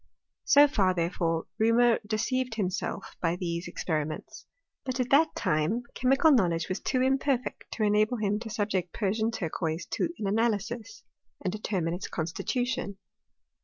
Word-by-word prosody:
So 290 +1 +7
far, 190 -9 +2
therefore, 165 -1 0
Reaumur 230 +1 +4
deceived 230 +3 -1
himself 195 -1 -3
by 170 0 +1
these 170 -1 -3
experiments; 155 -3 -4 0.4
but 260 -1 -3
at 250 -1 -1
that 310 +3 +4
time 155 +11 0
chemical 270 +5 +4
knowledge 170 - +2
was 185 - -2
too 255 -1 0
imperfect 265 -1 0
to 220 - -1
enable 215 +3 +3
him 210 -1 0
to 225 0 -7
subject 205 -5 -1
Persian 215 +2 0
turquoise 165 -5 -3
to - - 0
an 210 - -4
analysis, 225 +1 -1 0.4
and 185 - -1
determine 190 -6 -2
its 180 +3 -4
constitution. 200 - -2
210 Hz, 140 wpm, -28 LUFS, 180-240 Hz, 0.4 s, So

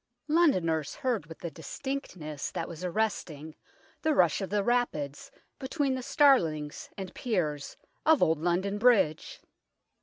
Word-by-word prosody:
Londoners 185 - +2
heard 245 - -1
with 165 +1 -10
a 170 - -3
distinctness 170 - -5
that 165 - -4
was 170 0 -8
arresting 170 -6 -2 0.5
the 310 -2 +2
rush 175 +1 +3
of 195 - -3
the 205 0 +1
rapids 195 - -1 0.3
between 270 0 -1
the 260 - -3
starlings 165 - +2
and 190 -2 -6
piers 160 - -2 0.3
of 315 -2 +5
Old 160 -1 +2
London 190 +4 0
Bridge. 210 -10 +2
185 Hz, 130 wpm, -29 LUFS, 160-250 Hz, 0.5 s, of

